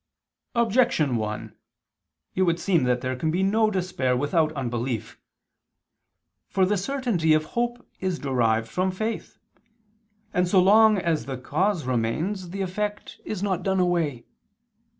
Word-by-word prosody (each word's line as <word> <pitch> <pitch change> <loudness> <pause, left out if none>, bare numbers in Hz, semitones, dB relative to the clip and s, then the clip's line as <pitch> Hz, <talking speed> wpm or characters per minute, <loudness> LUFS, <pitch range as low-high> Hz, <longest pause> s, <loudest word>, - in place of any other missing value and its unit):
Objection 235 - +2
1: 105 -1 -4 0.8
It 190 - -1
would 170 -2 +2
seem 170 -9 +2
that 125 0 +1
there 130 0 -2
can 155 +5 -1
be 180 +4 +1
no 215 +3 +3
despair 180 -10 0
without 155 +3 +1
unbelief. 120 -4 -3 1.3
For 190 -1 +2
the 205 +3 +1
certainty 200 - +1
of 155 - +1
hope 240 +1 -2
is 185 -2 -1
derived 115 -6 +1
from 185 +9 0
faith; 215 +4 -4 1.0
and 180 0 +2
so 185 +2 +4
long 215 +3 +6
as 165 -9 -1
the 135 -2 -4
cause 165 +6 0
remains 155 - -1
the 195 +3 -4
effect 205 +3 -4
is 200 -2 -4
not 190 -3 0
done 190 -1 0
away. 170 -9 0
180 Hz, 140 wpm, -25 LUFS, 130-200 Hz, 1.3 s, long